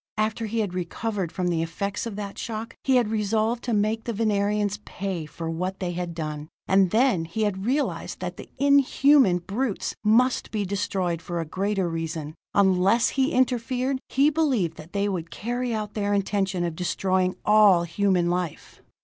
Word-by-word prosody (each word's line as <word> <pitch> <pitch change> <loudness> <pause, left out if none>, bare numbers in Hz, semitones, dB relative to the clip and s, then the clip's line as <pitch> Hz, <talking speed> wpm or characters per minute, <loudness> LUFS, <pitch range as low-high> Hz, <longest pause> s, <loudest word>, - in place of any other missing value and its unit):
After 220 +1 -1
he 225 +1 -1
had 200 -4 -3
recovered 185 +1 -3
from 180 -1 -1
the 165 -2 0
effects 200 +7 -3
of 220 - -6
that 200 -1 -6
shock, 225 0 -5
he 265 - +3
had 240 -4 +3
resolved 220 +2 0
to 245 - -1
make 215 +1 0
the 235 - -2
Venerians 205 -1 0
pay 180 -5 -4
for 165 +2 -6
what 180 +4 -3
they 180 -2 -2
had 175 -1 -4
done. 155 -1 -5 0.2
And 190 -1 +4
then 225 -6 +2
he 195 +7 -2
had 200 0 -1
realized 280 +3 -1
that - - -4
the - - -11
inhuman 280 -6 +5
brutes 200 +5 -2
must 240 +4 +3
be 210 -2 -2
destroyed 185 -3 -1
for 175 0 -4
a 165 - -2
greater 195 +3 -1
reason: 165 -2 -4 0.2
unless 195 +3 +4
he 270 +2 +1
interfered, 255 +1 0
he 280 +3 +3
believed 260 - +1
that 155 +3 -12
they 200 0 +1
would 175 -5 -3
carry 245 +2 -3
out 215 -2 -3
their 205 -1 0
intention 195 -2 0
of 170 -2 -2
destroying 185 +1 0
all 210 -5 +6
human 180 0 +1
life. 175 -3 -4
200 Hz, 175 wpm, -25 LUFS, 180-225 Hz, 0.2 s, all